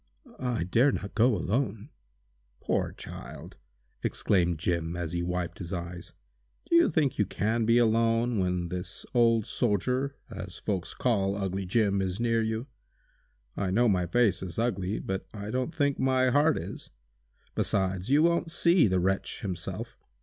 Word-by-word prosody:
"I 125 -8 -1
dare 115 +10 +3
not 100 - -5
go 115 +1 +4
alone!" 110 - -2 0.7
"Poor - - -1
child!" - - -10 0.4
exclaimed 90 -4 +1
Jim, 85 0 -1
as 85 -2 -3
he 85 0 -1
wiped 90 0 -3
his 85 -2 -6
eyes. 85 -1 -6 0.5
"Do 340 - +2
you 340 0 +6
think 145 -5 +1
you 105 - +4
can 110 +3 0
be 115 +1 +5
alone 115 0 +2
when 90 -2 -1
this 90 +1 -5
old 115 -3 +4
soldier, 125 +5 0
as - - -8
folks 95 -4 -3
call 100 -5 +1
'ugly 95 -1 -3
Jim,' 100 -1 +2
is 95 +1 -2
near 115 -1 +2
you? 110 +2 -2 0.9
I 95 - -1
know 120 +6 +3
my 90 -4 +2
face 115 +2 +2
is 90 -3 -6
ugly, 105 -4 -1
but 95 0 -4
I 105 0 -5
don't 130 +4 -1
think 145 -4 0
my 130 -1 +3
heart 150 +4 +4
is! - - -7 0.6
Besides, 95 0 -1
you 145 +3 +5
won't 170 0 +2
see 170 -2 +4
the 95 -1 +1
wretch 95 +2 -1
himself. 90 -4 -5
105 Hz, 155 wpm, -28 LUFS, 90-120 Hz, 0.9 s, you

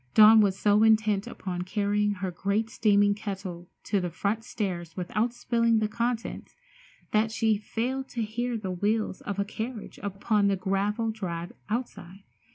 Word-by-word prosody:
Dawn 215 +1 +9
was 195 -2 +2
so 205 +1 +3
intent 215 -2 +3
upon 180 -2 -5
carrying 205 +2 0
her 190 -1 -4
great 200 +5 -1
steaming 205 -4 +3
kettle 190 -4 -6 0.2
up 200 - +4
the 175 - -2
front 210 +6 -2
stairs 180 -8 -4
without 210 +6 0
spilling 230 -1 +1
the 215 -1 +1
contents 235 +1 -3 0.6
that 215 +1 +2
she 220 -1 +2
failed 255 +5 -3
to 235 - -2
hear 235 +2 -2
the 195 -4 -4
wheels 205 +2 -1
of 205 -1 -4
a 200 - 0
carriage 220 +2 -6
upon 200 +1 +1
the 200 - +2
gravel 205 +4 0
drive 175 -5 -5 0.2
outside. 200 -5 -5
210 Hz, 160 wpm, -27 LUFS, 195-225 Hz, 0.6 s, Dawn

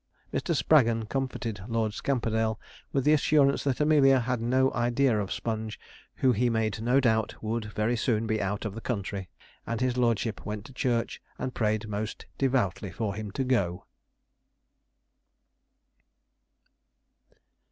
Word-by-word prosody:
Mr. - - 0
Spraggon 115 -7 +4
comforted 125 -6 -3
Lord 115 -2 0
Scamperdale 110 -4 0 0.3
with 135 - +1
the 150 - +5
assurance 145 -2 +3
that 135 -3 0
Amelia 140 -4 +5
had 125 -1 -1
no 130 +3 +2
idea 120 +1 +2
of 100 -2 -3
Sponge, 110 -1 -3 0.4
who 130 - +3
he 120 +2 +2
made 110 -1 0
no 125 +4 +3
doubt 110 -4 +1
would 110 0 -2
very 105 +3 -1
soon 115 -1 0
be 110 -1 0
out 100 +2 -2
of 105 - -3
the 115 - -7
country 100 -5 -3 0.4
and 115 -1 -2
his 125 -1 0
lordship 115 -3 0
went 105 0 -5
to 135 - -12
church 120 -2 -1 0.2
and 130 0 -4
prayed 110 -1 0
most 105 +1 -4
devoutly 120 -8 +1
for 100 +4 -3
him 105 0 -5
to 135 +7 -2
go. 100 -9 0
115 Hz, 140 wpm, -28 LUFS, 110-130 Hz, 0.4 s, the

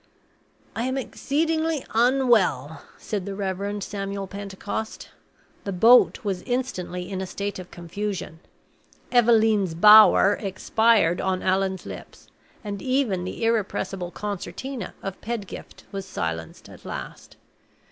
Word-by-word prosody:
"I 230 - -1
am 260 +1 -1
exceedingly 315 +3 -1
unwell," 230 - +2 0.2
said 205 -3 -4
the 200 - -4
Reverend 200 +1 -3
Samuel 195 0 -4
Pentecost. 200 +2 -6 0.5
The 200 - -3
boat 235 +7 +5
was 195 -3 -2
instantly 185 -8 -3
in 190 -1 -4
a 190 - -4
state 200 +1 -4
of 180 - -9
confusion. 175 -1 -5 0.7
"Eveleen's 220 -7 +4
Bower" 210 +1 +7
expired 200 -2 +2
on 185 -1 -1
Allan's 190 0 0
lips, - - -10 0.3
and 200 -2 -5
even 255 -9 0
the 185 - -5
irrepressible 195 -5 -1
concertina 210 +7 -6
of 195 -1 -6
Pedgift 225 -4 -6
was 195 -1 -5
silenced 80 - -5
at - - -14
last. - - -8
200 Hz, 115 wpm, -24 LUFS, 185-230 Hz, 0.7 s, Bower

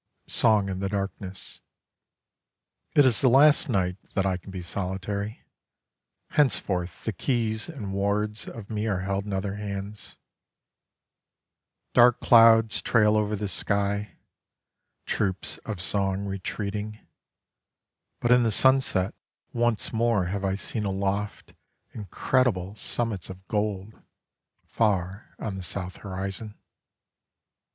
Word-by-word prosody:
IV - - -8
SONG 105 -3 +4
IN 95 -1 -3
THE 95 0 -2
DARKNESS 100 -1 -4 1.3
It 145 - +7
is 125 -4 +3
the 130 - +5
last 145 +4 +5
night 90 -5 0 0.2
that 95 -2 +1
I 95 -1 +1
can 90 +2 -10
be 95 -2 -6
solitary: 100 +3 -4 0.9
Henceforth 95 - 0
the - - -1
keys 115 -1 -1
and 110 -12 -6
wards 105 +2 -1
of 110 -3 -9
me 110 0 -1
are 95 -4 0
held 100 +1 -2
in 100 - -3
other 95 +1 -2
hands. 100 0 -6 1.8
Dark 120 0 +6
clouds 115 -1 +6
trail 105 -2 +3
over 105 0 +1
the 105 0 -3
sky: 100 -1 -1 0.9
Troops 95 -3 -2
of 105 -4 -4
song 95 +1 0
retreating: 105 +2 -4 1.2
But 120 - +1
in 125 0 +7
the 115 - +2
sunset 125 -5 +3 0.4
Once 120 -1 0
more 115 -4 +2
have 100 +3 -3
I 95 -1 0
seen 105 +2 -4
aloft 100 +1 -2 0.4
Incredible 105 -1 0
summits 110 -5 -3
of 95 0 -11
gold, 105 -1 -2 0.6
far 100 -1 -1
on 105 - -4
the 95 - -5
south 90 +1 -5
horizon. 95 +2 -5
100 Hz, 120 wpm, -26 LUFS, 95-110 Hz, 1.8 s, It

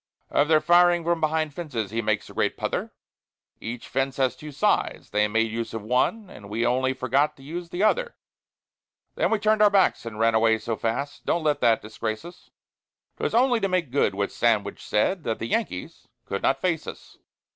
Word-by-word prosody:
'" - - -48
Of 145 - +3
their 155 -1 +4
firing 175 0 +4
from 170 0 0
behind 155 -1 0
fences 125 - -4
he 115 +1 -1
makes 110 -1 -1
a - - -12
great - - 0
pother; - - -3 0.7
Every 120 +2 -4
fence 135 +2 -3
has 130 -2 +1
two 150 -1 -9
sides, 140 - 0
they 105 0 +2
made 110 +1 0
use 115 0 -4
of 110 - -5
one, 130 - 0
and 100 - -12
we 115 +3 -1
only 130 +2 +1
forgot 135 +4 +1
to 135 - -15
use 170 +4 -6
the 175 +3 -2
other; - - +1 1.0
Then - - +1
we 220 - +2
turned 215 +1 +2
our 210 - +7
backs 195 -2 +3
and 110 -2 -7
ran 115 +1 +3
away 110 0 +4
so 115 +1 -3
fast; 140 +7 -3
don't 170 - +1
let 150 -2 +1
that 115 -1 +3
disgrace 110 +2 -4
us, 175 +1 -13 0.7
'Twas - - -2
only 245 0 +4
to 195 - 0
make 180 -7 -1
good 140 -7 +1
what 100 0 -1
Sandwich 105 -4 0
said, 165 - 0
that 115 -4 -2
the - - -4
Yankees 220 - -3 0.2
could 100 - -3
not 135 0 +1
face 170 -4 -1
us. - - -10
135 Hz, 205 wpm, -25 LUFS, 115-175 Hz, 1.0 s, our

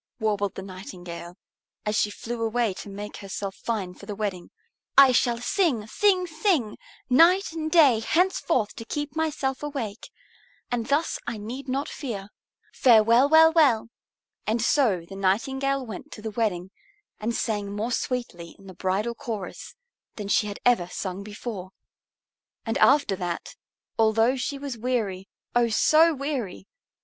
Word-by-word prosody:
warbled 205 -3 0
the 190 - -6
Nightingale, 180 -2 -9 0.5
as 210 0 0
she 210 - +2
flew 230 +3 -6
away 225 -2 +1
to 195 - -9
make 205 +1 -7
herself 195 0 -5
fine 205 -6 -3
for 200 - -14
the 205 - -4
wedding. 195 -4 -4 0.5
"I 275 -2 +9
shall 240 -1 +2
sing, 250 - 0
sing, 370 - +2
sing 315 - 0 0.3
night 335 +10 +5
and 315 -1 -3
day 285 -9 +6
henceforth 330 - +1
to - - -6
keep 295 +3 -4
myself 300 -4 -1
awake. 265 -8 -5 0.6
And 235 -2 -1
thus 290 +4 0
I 235 -2 -3
need 245 +6 -7
not 275 +3 -1
fear. 210 -8 -6 0.4
Farewell 235 +2 +5
well 320 +1 +7
well!" 265 -9 +4 0.6
And 220 +2 +1
so 225 - +2
the 195 - -9
Nightingale 265 +8 0
went 225 +6 -8
to 215 - -10
the 220 - -4
wedding 195 -5 -1 0.5
and 230 +2 -2
sang 205 -3 -2
more 215 +4 -3
sweetly 240 -10 -3
in 195 - -18
the 190 - -10
bridal 195 +6 -1
chorus 230 - -6 0.4
than 205 -2 -6
she 210 +1 +3
had 205 - -5
ever 240 -8 +3
sung 185 +1 -5
before. 205 -2 -7 0.9
And 225 - -1
after 280 -8 +4
that, 175 -2 -4 0.5
although 225 +3 +4
she 275 +2 -3
was 275 -4 -6
weary, 215 -6 -2 0.3
oh, 240 -1 +4
so 315 +9 +5
weary! 260 - -4
230 Hz, 150 wpm, -25 LUFS, 200-275 Hz, 0.9 s, I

